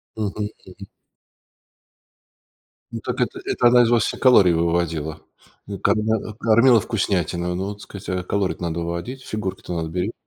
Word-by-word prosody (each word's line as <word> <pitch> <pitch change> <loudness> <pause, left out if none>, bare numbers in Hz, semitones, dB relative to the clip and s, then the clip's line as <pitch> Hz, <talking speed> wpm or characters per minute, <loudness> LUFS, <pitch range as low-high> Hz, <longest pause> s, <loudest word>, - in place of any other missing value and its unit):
Мгм 105 -1 -3 0.2
мгм. 95 +1 -12 2.1
Ну - - -5
так, - - -3
это - - -1
это 120 - +2
она 120 0 +6
из 115 - +2
вас 120 -2 +3
все - - -2
калории 110 -9 +6
выводила. 80 -2 -1 0.6
Когда 110 0 +2 0.2
кормила 115 +2 +5
вкуснятиной. 90 -5 -1
Ну 95 +2 -2
вот 105 0 -8
сказать, 100 -1 -9
а 90 0 -2
калории-то 95 0 -2
надо 85 0 -2
выводить. 85 +11 -5
Фигурки-то 100 -5 -5
надо 80 -1 -3
бере 90 +6 -2
95 Hz, 145 wpm, -22 LUFS, 85-110 Hz, 2.1 s, она